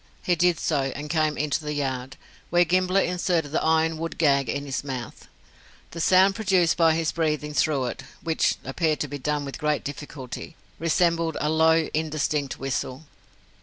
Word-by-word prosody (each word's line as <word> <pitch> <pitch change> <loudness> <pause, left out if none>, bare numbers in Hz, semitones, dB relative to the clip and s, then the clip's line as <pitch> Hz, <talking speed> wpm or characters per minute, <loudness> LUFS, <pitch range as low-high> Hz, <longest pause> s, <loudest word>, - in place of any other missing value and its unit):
He 180 - +2
did 175 -1 +2
so, 140 -4 0
and 150 +1 -5
came 155 -2 +1
into 150 0 0
the 150 0 -3
yard, 135 -2 -3 0.3
where 175 +1 +4
Gimblett 185 +2 +2
inserted 175 -4 0
the - - 0
iron 160 0 +2
wood 165 0 -4
gag 140 -5 +3
in 140 +3 -2
his 135 -1 -3
mouth. 130 -4 -6 0.6
The 165 - -5
sound 190 +3 +5
produced 185 -5 +2
by 165 -1 +4
his 165 -1 0
breathing 150 -2 -1
through 145 -3 +1
it 120 - -5 0.2
(which 165 -1 +1
appeared 155 +3 0
to 145 - -1
be 145 +1 -6
done 145 +2 -1
with 140 - -7
great 150 -2 0
difficulty) 145 +1 -7 0.2
resembled 165 -1 +1
a 150 - 0
low, 160 0 +4
indistinct 150 -3 -1
whistle. 135 +1 -3
155 Hz, 170 wpm, -25 LUFS, 145-165 Hz, 0.6 s, sound